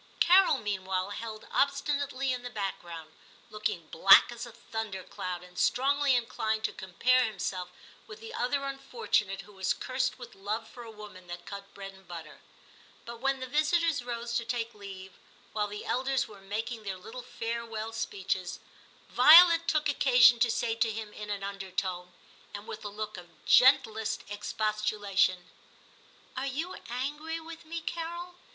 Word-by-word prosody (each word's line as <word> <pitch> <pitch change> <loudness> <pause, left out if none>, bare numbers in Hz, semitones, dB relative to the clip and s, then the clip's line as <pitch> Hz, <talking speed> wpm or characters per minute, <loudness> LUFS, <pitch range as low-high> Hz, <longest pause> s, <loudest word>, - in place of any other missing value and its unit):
Carol 370 -3 +6
meanwhile 190 -3 -2
held 215 0 -6
obstinately 280 -1 0
in 250 - -4
the 245 - -6
background, 175 -7 -5 0.4
looking 210 -6 -2
black 195 +7 +7
as 240 0 -6
a - - -10
thunder 220 -4 -5
cloud, 180 -1 -5
and 180 0 -10
strongly 280 +1 +3
inclined 220 -2 -1
to - - -1
compare 250 +8 +2
himself 185 -3 -3 0.4
with 430 0 -10
the 455 0 -9
other 275 +3 0
unfortunate 235 -8 -1
who 205 +2 -16
was 190 -1 0
cursed 260 0 -1
with 245 -2 -10
love 210 +3 -4
for 245 - -12
a 230 - -9
woman 210 -4 -12
that 175 0 -8
cut 200 0 -8
bread 195 -1 -8
and 190 -1 -19
butter. 165 -3 -9 0.6
But 235 0 -8
when 270 +1 0
the - - -2
visitors 305 +1 +1
rose 235 -1 -4
to 235 - -2
take 235 0 -3
leave, 190 -2 -10 0.4
while 210 -1 0
the 205 0 -7
elders 265 +1 0
were 205 -2 -14
making 220 +4 -4
their 195 -3 -5
little 220 +7 -9
farewell 225 -2 -4
speeches, 190 -4 -3 0.5
Violet 335 +5 +8
took 305 -2 +2
occasion 250 -4 +6
to 235 0 +3
say 225 0 0
to 230 0 +1
him 215 -1 -6
in 210 0 -8
an 200 -1 -3
undertone, 190 -2 -4 0.4
and 205 +1 -7
with 215 - -8
a 205 - -4
look 210 0 -6
of 175 -1 -14
gentlest 225 -4 +4
expostulation 205 -3 0 0.3
— - - -28
* - - -28
Are 270 - -2
you 315 +7 -3 0.2
angry 295 +6 -3
with 325 0 -10
me, 330 +1 -5
Carol 345 +2 -5
225 Hz, 165 wpm, -30 LUFS, 195-260 Hz, 0.6 s, Violet